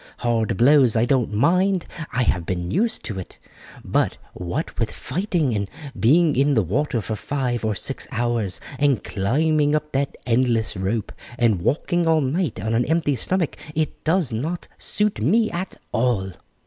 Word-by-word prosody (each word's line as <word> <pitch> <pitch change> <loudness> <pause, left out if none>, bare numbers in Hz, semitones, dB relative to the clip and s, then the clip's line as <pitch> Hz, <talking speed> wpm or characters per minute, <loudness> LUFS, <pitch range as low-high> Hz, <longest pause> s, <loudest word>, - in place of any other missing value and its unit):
Hard 115 -3 0
blows 130 -2 +5
I 115 +1 +3
don't 125 -4 +1
mind 180 - +2 0.3
I 125 0 +1
have 90 -6 +1
been 90 0 -3
used 225 - 0
to 105 -6 -4
it; 90 - -9 0.5
but - - +1 0.2
what 90 - -4
with 115 -2 +1
fighting, 160 - -1
and 100 -2 -2 0.3
being 155 +6 +4
in 140 +2 +3
the 110 - +3
water 120 - 0
for 110 +2 -3
five 125 -1 -2
or 110 -1 0
six - - -4
hours, 115 -5 -1 0.2
and 140 -4 +2
climbing 145 +8 +1
up 150 0 -2
that 140 +1 -1
endless 115 -2 +1
rope, 100 +3 -2 0.3
and 115 -7 +2
walking 170 - +1
all 160 -1 +4
night 150 - -1
on 110 +4 -2
an 120 +2 +2
empty 160 -1 +1
stomach, 170 +6 0 0.2
it 155 0 -2
does 165 -4 +1
not 155 +10 -3
suit 210 - -1
me 215 - +3
at 175 +2 -4 0.2
all." 115 -6 0
130 Hz, 165 wpm, -23 LUFS, 110-155 Hz, 0.5 s, blows